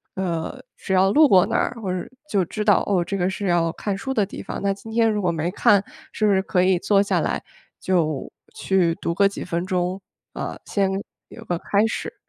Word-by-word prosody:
呃， 185 Hz, +7 st, -3 dB
只 190 Hz, -, -3 dB
要 190 Hz, +1 st, +4 dB
路 305 Hz, +3 st, +6 dB
过 185 Hz, -6 st, +5 dB
那 -, -, 0 dB
儿， 245 Hz, -, 0 dB
或 185 Hz, -, -2 dB
者 185 Hz, -, -1 dB
是 -, -, -8 dB, 0.2 s
就 190 Hz, -3 st, +1 dB
知 210 Hz, +5 st, -4 dB
道： 205 Hz, -1 st, +4 dB
“哦， 185 Hz, -4 st, +2 dB
这 195 Hz, +3 st, -3 dB
个 180 Hz, +1 st, +1 dB
是 195 Hz, +1 st, -4 dB
要 170 Hz, -2 st, +2 dB
看 200 Hz, -2 st, -3 dB
书 265 Hz, +5 st, -3 dB
的 215 Hz, -5 st, +2 dB
地 195 Hz, -, -8 dB
方。” -, -, -6 dB
那 200 Hz, 0 st, +2 dB
今 220 Hz, +3 st, -12 dB
天 225 Hz, 0 st, +2 dB
如 210 Hz, -1 st, -1 dB
果 180 Hz, -, +1 dB
没 165 Hz, +2 st, -2 dB
看， 200 Hz, 0 st, +4 dB, 0.3 s
是 215 Hz, -, 0 dB
不 210 Hz, -, +4 dB
是 190 Hz, -, +3 dB
可 185 Hz, -1 st, +1 dB
以 185 Hz, -1 st, +3 dB
坐 200 Hz, +1 st, +3 dB
下 -, -, +1 dB
来 -, -, -1 dB, 0.4 s
就 155 Hz, -6 st, 0 dB, 0.2 s
去 180 Hz, -4 st, +1 dB
读 170 Hz, -, -1 dB
个 200 Hz, +3 st, +4 dB
几 200 Hz, -, -5 dB
分 170 Hz, +2 st, -2 dB
钟 185 Hz, +1 st, -1 dB, 0.3 s
呃， -, -, -5 dB
先 195 Hz, -2 st, 0 dB, 0.4 s
有 230 Hz, -, -11 dB
个 175 Hz, -5 st, -2 dB
开 205 Hz, +2 st, +2 dB
始。 225 Hz, -, -4 dB
190 Hz, 250 characters per minute, -23 LUFS, 180-205 Hz, 0.4 s, 路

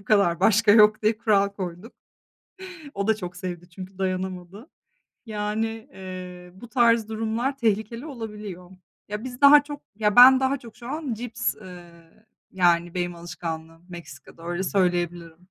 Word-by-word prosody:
Bu -, -, -19 dB
kadar, 200 Hz, -5 st, +2 dB
başka 220 Hz, 0 st, +4 dB
yok 215 Hz, 0 st, +5 dB
diye 215 Hz, 0 st, +1 dB
kural 205 Hz, -3 st, +2 dB
koyduk. 190 Hz, +2 st, -7 dB, 1.0 s
O 200 Hz, +1 st, -2 dB
da 220 Hz, -, +2 dB
çok 180 Hz, -4 st, -7 dB
sevdi 175 Hz, -1 st, -7 dB
çünkü 185 Hz, +2 st, -11 dB
dayanamadı. 185 Hz, -, -4 dB, 0.6 s
Yani, 210 Hz, 0 st, -2 dB, 0.3 s
eee, 180 Hz, -1 st, -9 dB
bu 215 Hz, +6 st, -12 dB
tarz 230 Hz, -3 st, +3 dB
durumlar 225 Hz, +5 st, -2 dB
tehlikeli 230 Hz, +3 st, -1 dB
olabiliyor. 210 Hz, -, -8 dB, 0.4 s
Ya, 210 Hz, +3 st, -5 dB
biz 250 Hz, -1 st, -8 dB
daha 285 Hz, +1 st, +8 dB
çok, 290 Hz, 0 st, -9 dB
ya 210 Hz, -1 st, 0 dB
ben 260 Hz, +2 st, +9 dB
daha 265 Hz, +1 st, +1 dB
çok, 230 Hz, -3 st, -14 dB
şu 240 Hz, -, -10 dB
an 290 Hz, -3 st, -3 dB
cips, 230 Hz, 0 st, -3 dB
eee, 180 Hz, -4 st, -12 dB, 0.6 s
yani, 175 Hz, -2 st, +2 dB
benim 175 Hz, -1 st, -2 dB
alışkanlığım 165 Hz, -1 st, -7 dB
Meksika'da 165 Hz, -3 st, -12 dB
öyle, 175 Hz, +2 st, -2 dB
söyleyebilirim. 175 Hz, -3 st, -1 dB
200 Hz, 145 wpm, -24 LUFS, 180-225 Hz, 1.0 s, ben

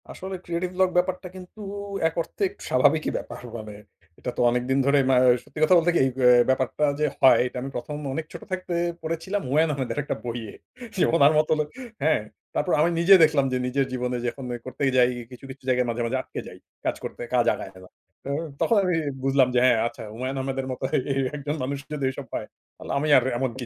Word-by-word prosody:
আসলে 190 Hz, +1 st, -6 dB
creative 175 Hz, +1 st, -2 dB
vlog 185 Hz, 0 st, +3 dB
ব্যাপারটা 180 Hz, +1 st, 0 dB
কিন্তু 185 Hz, +3 st, -11 dB, 0.5 s
এক 165 Hz, -, -4 dB
অর্থে 165 Hz, -, -11 dB
একটু 405 Hz, -, -15 dB
স্বাভাবিকই 145 Hz, +5 st, +3 dB
ব্যাপার। -, -, -8 dB, 0.2 s
মানে 105 Hz, -1 st, -8 dB, 0.5 s
এটা 125 Hz, -, -4 dB
তো -, -, +1 dB
অনেকদিন 125 Hz, +2 st, 0 dB
ধরে 140 Hz, +1 st, +4 dB
ম্যা 130 Hz, -, +5 dB, 0.3 s
সত্যি 145 Hz, +2 st, -10 dB
কথা 170 Hz, +4 st, +6 dB
বলতে 170 Hz, +1 st, +3 dB
কি, -, -, +4 dB
এই -, -, +2 dB
অ্যা 125 Hz, -2 st, +5 dB
এই 120 Hz, -, +4 dB
ব্যাপারটা 130 Hz, +3 st, +1 dB
যে, 150 Hz, -, +2 dB, 0.2 s
হয় 130 Hz, -, +7 dB
এটা 125 Hz, -, -8 dB
আমি 135 Hz, -, -4 dB
১ম, 145 Hz, +4 st, -4 dB, 0.2 s
অনেক 160 Hz, +3 st, -3 dB
ছোট -, -, -8 dB
থাকতে 185 Hz, -1 st, -3 dB, 0.3 s
পড়েছিলাম 165 Hz, +5 st, -3 dB
হুমায়ূন 155 Hz, +4 st, +2 dB
আহমেদের 135 Hz, -1 st, -3 dB
একটা -, -, -3 dB
বইয়ে। 115 Hz, -3 st, -5 dB, 0.5 s
যে, -, -, +5 dB
উনার 145 Hz, -1 st, +6 dB
মত 155 Hz, -, +1 dB
লোক 150 Hz, -, 0 dB, 0.4 s
হ্যাঁ, 155 Hz, -6 st, +3 dB, 0.3 s
তারপর 180 Hz, -, 0 dB
আমি 165 Hz, -, +4 dB
নিজে 185 Hz, +3 st, +8 dB
দেখলাম, 150 Hz, -3 st, +4 dB
যে, -, -, +2 dB
নিজের 135 Hz, +2 st, +1 dB
জীবনে 125 Hz, 0 st, -2 dB
যখন 135 Hz, +3 st, -5 dB
ওই 120 Hz, -, -5 dB
করতেই 130 Hz, +1 st, -1 dB
যাই 125 Hz, -1 st, +5 dB, 0.2 s
কিছু, 125 Hz, -, -12 dB
কিছু 135 Hz, +1 st, -13 dB
জায়গায় 125 Hz, -1 st, +2 dB
মাঝে, 120 Hz, +1 st, -2 dB
মাঝে 125 Hz, +3 st, -1 dB
আটকে -, -, -8 dB
যাই। -, -, -11 dB, 0.3 s
কাজ -, -, 0 dB
করতে -, -, -6 dB
কাজ 120 Hz, -, +3 dB
আগায় 95 Hz, -, -8 dB
গেলাম। 95 Hz, 0 st, -14 dB, 0.3 s
ত -, -, -39 dB, 0.4 s
তখন 230 Hz, -, +3 dB
আমি 180 Hz, -2 st, +1 dB, 0.3 s
বুঝলাম 135 Hz, -1 st, +4 dB
যে, -, -, +5 dB
হ্যাঁ, 125 Hz, -2 st, +5 dB
আচ্ছা -, -, -8 dB
হুমায়ুন 130 Hz, +4 st, -4 dB
আহমেদের 135 Hz, 0 st, -3 dB
মত 130 Hz, -, -6 dB, 0.3 s
এ -, -, +2 dB, 0.2 s
একজন 145 Hz, +1 st, -3 dB
মানুষ 140 Hz, +2 st, -2 dB, 0.2 s
যদি 145 Hz, -2 st, -4 dB
ওইসব 130 Hz, -, -7 dB
পায়, -, -, -3 dB, 0.3 s
তাহলে -, -, -11 dB
আমি 150 Hz, +2 st, 0 dB
আর 130 Hz, -, +3 dB
এমন 130 Hz, 0 st, -1 dB
কি 125 Hz, -, -4 dB
135 Hz, 220 wpm, -25 LUFS, 125-160 Hz, 0.5 s, নিজে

